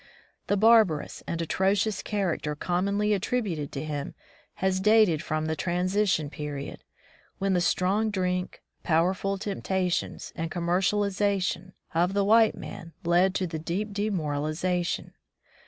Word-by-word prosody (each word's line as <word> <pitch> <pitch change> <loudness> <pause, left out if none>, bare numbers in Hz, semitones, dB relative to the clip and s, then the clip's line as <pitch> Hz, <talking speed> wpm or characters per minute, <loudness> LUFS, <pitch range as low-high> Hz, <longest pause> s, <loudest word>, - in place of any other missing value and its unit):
The 205 - +2
bar 225 +2 +7
barous 155 -7 -5
and 170 - -3
atrocious 195 +5 +1
character 180 -7 -2
commonly 200 +6 0
attributed 195 - -1
to 135 - -4
him 145 -2 -4 0.4
has 190 0 0
dated 210 -6 +4
from 155 -2 -2
the 160 0 -1
transi 185 +5 0
tion 155 -5 0
period, 145 -3 -6 0.5
when 195 0 0
the 180 - +2
strong 195 +5 +1
drink, 180 -2 -2 0.2
powerful 185 +4 +1
temptations, 190 -2 -2
and 165 0 -3
commercialism 190 +2 0 0.2
of 175 +3 +2
the 200 -1 +2
white 220 +1 +5
man 170 -4 -9
led 180 +3 +3
to 190 - 0
deep 175 +6 -3
demoralization. 175 -2 -1
185 Hz, 125 wpm, -27 LUFS, 165-200 Hz, 0.5 s, bar